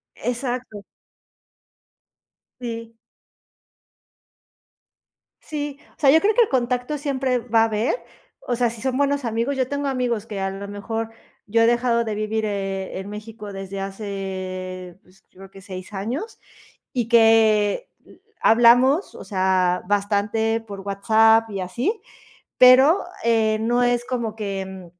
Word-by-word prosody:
Exacto. 245 -3 -4 1.8
Sí. 230 -2 -7 2.4
Sí, 290 -2 -5 0.2
o - - -40
sea, 275 -3 +5
yo 320 - +6
creo 425 +2 +3
que - - +5
el 450 - +3
contacto 250 +2 -1
siempre 265 -3 -1
va 230 -1 +2
a - - +6
haber, 220 - 0 0.5
o 245 - -2
sea, 240 0 +1
si 225 -1 -9
son 260 0 -1
buenos 285 -1 +1
amigos, 230 +4 -1
yo 260 -2 0
tengo 285 +1 -2
amigos 245 -5 -1
que 210 -3 -5
a 195 0 -1
lo 195 +1 -7
mejor 225 +3 -4 0.4
yo 230 +2 +2
he - - +5
dejado 235 0 +2
de 220 -2 -3
vivir, 215 +1 -2
eh, 195 -2 -3
en 195 - -7
México 210 0 -8
desde 195 0 -6
hace, 190 -2 -6
pues, 185 +1 -25
creo 195 +1 -14
que 195 0 -14
6 185 0 -9
años 245 - -4 0.5
y 240 -4 -1
que 225 - +4 0.5
hablamos, 245 - +5
o - - -9
sea, 185 -2 +1
bastante 210 +2 0
por 200 -3 -9
WhatsApp 220 +3 +3
y 195 -2 -4
así, 245 - -2 0.6
pero, 265 +8 +7 0.2
eh, 220 -2 +2
no 240 +2 +1
es 245 0 +1
como 235 -4 -3
que, 195 -3 -4
mm, 190 -2 -10
225 Hz, 140 wpm, -22 LUFS, 200-245 Hz, 2.4 s, pero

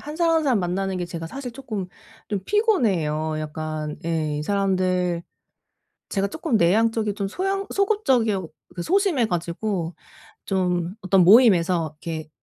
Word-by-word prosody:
1 300 +1 -7
사람, 335 -1 +3
1 320 - +2
사람 250 -7 +2
만나는 190 +2 -1
게 180 - -2
제가 165 -1 -6
사실 265 +6 -6
쪼끔 225 -7 -5 0.4
좀 200 -2 -1
피곤해요 190 - +1
약간. 155 0 -5
예. 155 -3 -1
이 150 - -3
사람들 185 -2 0 0.9
제가 200 -1 0
쪼끔 320 - -1
내향적이고 215 +4 +2
좀 200 -1 -3
소향 390 - -2
소극적이어 260 - +1 0.3
그 175 - -3
소심해 360 - +2
가지고 175 0 -2 0.5
좀 180 -1 -1
어떤 190 -1 +4
모임에서 180 - +5
이렇게 160 -2 -5
195 Hz, 290 characters per minute, -23 LUFS, 170-245 Hz, 0.9 s, 모임에서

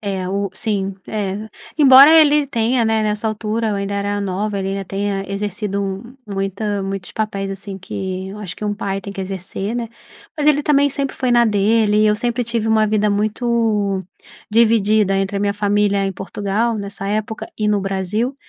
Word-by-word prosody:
É 195 -3 -3
o 200 +1 -2
sim, 195 -1 -2
é 205 0 -3 0.3
embora 275 0 +9
ele 300 -2 +6
tenha, 235 -2 +1
né, 220 -1 +1
nessa 210 +1 -1
altura 220 +1 -2
eu 210 - -1
ainda 200 0 -3
era 205 0 -1
nova, 200 +1 -2
ele 190 0 -2
ainda 195 0 -3
tenha 195 +1 -2
exercido 200 -1 -3 0.2
muita 200 +1 -2
muitos 195 -1 -5
papéis 200 -3 -2
assim 195 0 -7
que 190 0 -5
acho 190 -4 -6
que - - -6
um 205 0 -1
pai 195 -1 -3
tem 200 +1 -8
que 195 - -6
exercer, 195 +3 -4
né. 240 - -2 0.5
Mas 300 -1 +2
ele 295 -1 +4
também 285 -1 +3
sempre 275 0 -2
foi 255 -2 -1
na 240 0 +5
dele, 210 0 +2
e 215 - +4
eu 210 0 +3
sempre 240 +2 -1
tive 230 -1 -2
uma 220 -1 +3
vida 210 0 +1
muito 210 -1 0 0.5
dividida 215 -3 +3
entre 195 +1 -1
a - - -1
minha 200 0 0
família 205 -1 +1
em 195 - -1
Portugal 205 +4 -2
nessa 200 0 -6
época 215 +2 -3
e 215 -1 0
no 205 -1 +2
Brasil. 195 +6 -2
205 Hz, 185 wpm, -19 LUFS, 195-220 Hz, 0.5 s, embora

